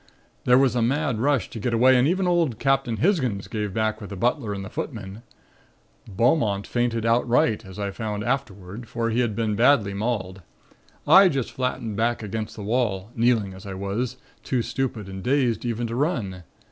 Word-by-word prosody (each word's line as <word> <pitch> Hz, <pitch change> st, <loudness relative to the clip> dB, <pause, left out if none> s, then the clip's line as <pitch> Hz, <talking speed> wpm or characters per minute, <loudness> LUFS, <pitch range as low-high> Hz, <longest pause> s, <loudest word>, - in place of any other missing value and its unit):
There 125 Hz, 0 st, +6 dB
was 130 Hz, -3 st, +3 dB
a 120 Hz, -, +1 dB
mad 135 Hz, 0 st, 0 dB
rush 135 Hz, -4 st, +1 dB
to 115 Hz, -, -6 dB
get 115 Hz, +2 st, -1 dB
away 130 Hz, +3 st, +5 dB
and 125 Hz, +2 st, +4 dB
even 185 Hz, +3 st, +1 dB
old 170 Hz, -10 st, +1 dB
Captain 135 Hz, -3 st, +1 dB
Hisgins 130 Hz, -, 0 dB
gave 105 Hz, -3 st, -3 dB
back 110 Hz, +1 st, -1 dB
with 100 Hz, -, -8 dB
the 100 Hz, -, -6 dB
butler 120 Hz, +2 st, 0 dB
and 100 Hz, -1 st, -4 dB
the -, -, -8 dB
footmen. 100 Hz, -1 st, -6 dB, 0.9 s
Beaumont 110 Hz, -, +1 dB
fainted 120 Hz, -2 st, -1 dB
outright, 115 Hz, -1 st, +2 dB
as 95 Hz, -, -11 dB
I 100 Hz, -1 st, -2 dB
found 105 Hz, 0 st, -4 dB
afterward, 110 Hz, -3 st, -4 dB
for 115 Hz, -1 st, -2 dB
he 115 Hz, -, 0 dB
had 115 Hz, -4 st, 0 dB
been 110 Hz, -1 st, 0 dB
badly 115 Hz, -4 st, +4 dB
mauled. 100 Hz, -3 st, -3 dB, 0.7 s
I 185 Hz, +5 st, +8 dB
just 135 Hz, -6 st, -2 dB
flattened 120 Hz, -5 st, -3 dB
back 115 Hz, 0 st, 0 dB
against 110 Hz, +1 st, -4 dB
the 105 Hz, -, -7 dB
wall, 105 Hz, -2 st, -1 dB
kneeling 115 Hz, -4 st, +2 dB
as 95 Hz, +1 st, -11 dB
I 95 Hz, -, -5 dB
was, 105 Hz, +6 st, -3 dB, 0.2 s
too 125 Hz, -3 st, -1 dB
stupid 120 Hz, -7 st, -3 dB
and 95 Hz, 0 st, -7 dB
dazed 125 Hz, 0 st, +1 dB
even 120 Hz, 0 st, -2 dB
to 115 Hz, -, -4 dB
run. 115 Hz, -, -2 dB
115 Hz, 185 wpm, -24 LUFS, 105-125 Hz, 0.9 s, I